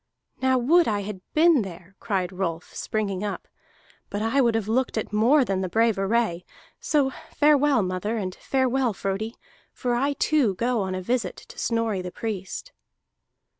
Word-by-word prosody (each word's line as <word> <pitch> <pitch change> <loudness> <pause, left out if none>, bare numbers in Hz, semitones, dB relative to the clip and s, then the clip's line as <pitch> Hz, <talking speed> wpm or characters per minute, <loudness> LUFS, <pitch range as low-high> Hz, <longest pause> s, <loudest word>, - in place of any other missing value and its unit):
"Now, 260 0 +3
would 325 +8 +4
I 205 -2 0
had 200 -2 -6
been 320 -3 +5
there!" 190 -1 -9
cried 190 -6 -1
Rolf, 180 -3 -4
springing 205 -3 -2
up. 205 - -4 0.6
"But 205 +1 -3
I 230 +5 +2
would 235 -3 +3
have 220 -2 -1
looked 240 +2 0
at 215 - -3
more 250 +6 +4
than 195 -3 -1
the 185 - -2
brave 225 0 +2
array. 195 -3 +1 0.4
So 285 -4 +1 0.2
farewell, 290 -5 +4
mother, 185 +5 -2
and 185 -3 -3
farewell, 260 -1 0
Frodi, 200 +4 -3 0.4
for 245 -1 -2
I 275 +4 +1
too 280 -9 +2
go 235 +2 0
on 190 -1 -2
a 185 - -4
visit 230 -3 -1
to - - -13
Snorri 230 -4 0
the 180 - -5
Priest." 215 - -5
220 Hz, 170 wpm, -25 LUFS, 195-255 Hz, 0.6 s, been